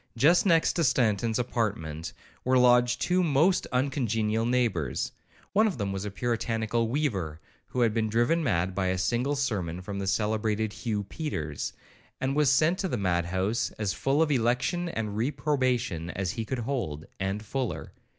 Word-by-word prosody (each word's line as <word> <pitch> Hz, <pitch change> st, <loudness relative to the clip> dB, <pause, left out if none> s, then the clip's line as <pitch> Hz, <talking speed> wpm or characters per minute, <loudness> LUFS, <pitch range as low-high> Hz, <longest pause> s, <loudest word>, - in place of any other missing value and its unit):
Just 170 Hz, -, +5 dB
next 165 Hz, -3 st, +4 dB
to 170 Hz, -, +1 dB
Stanton's 115 Hz, -4 st, +2 dB
apartment 100 Hz, -10 st, -2 dB, 0.3 s
were 130 Hz, 0 st, +3 dB
lodged 125 Hz, 0 st, +4 dB
two 180 Hz, +1 st, +2 dB
most 165 Hz, +3 st, +3 dB
uncongenial 115 Hz, -4 st, 0 dB
neighbours. 115 Hz, -, 0 dB, 0.4 s
One 215 Hz, +2 st, +5 dB
of 190 Hz, -, -2 dB
them 100 Hz, -3 st, -2 dB
was 95 Hz, +1 st, -3 dB
a -, -, -2 dB
puritanical 115 Hz, +1 st, -1 dB
weaver, 100 Hz, -, -1 dB, 0.3 s
who 125 Hz, -, -2 dB
had 115 Hz, -3 st, +3 dB
been 110 Hz, -1 st, 0 dB
driven 120 Hz, +10 st, +2 dB
mad 95 Hz, -, +1 dB
by 95 Hz, 0 st, 0 dB
a 95 Hz, 0 st, 0 dB
single 120 Hz, +10 st, 0 dB
sermon 100 Hz, -11 st, -2 dB
from 100 Hz, +1 st, -5 dB
the 100 Hz, -, -3 dB
celebrated 110 Hz, +1 st, 0 dB
Hugh 105 Hz, -4 st, -2 dB
Peters, 80 Hz, -, -4 dB, 0.5 s
and 130 Hz, +1 st, -1 dB
was 150 Hz, -3 st, +4 dB
sent 155 Hz, +7 st, +3 dB
to 195 Hz, -, 0 dB
the 125 Hz, -, -2 dB
mad 90 Hz, -4 st, +1 dB
house 95 Hz, +6 st, 0 dB
as 105 Hz, -3 st, -1 dB
full 140 Hz, +4 st, +2 dB
of 155 Hz, -, -1 dB
election 130 Hz, +8 st, +1 dB
and 110 Hz, -8 st, -3 dB
reprobation 125 Hz, -, 0 dB
as 90 Hz, -1 st, -2 dB
he 115 Hz, -, -4 dB
could 130 Hz, -, -3 dB
hold,—and 95 Hz, -, -3 dB
fuller. 130 Hz, 0 st, -3 dB
115 Hz, 165 wpm, -28 LUFS, 100-135 Hz, 0.5 s, Just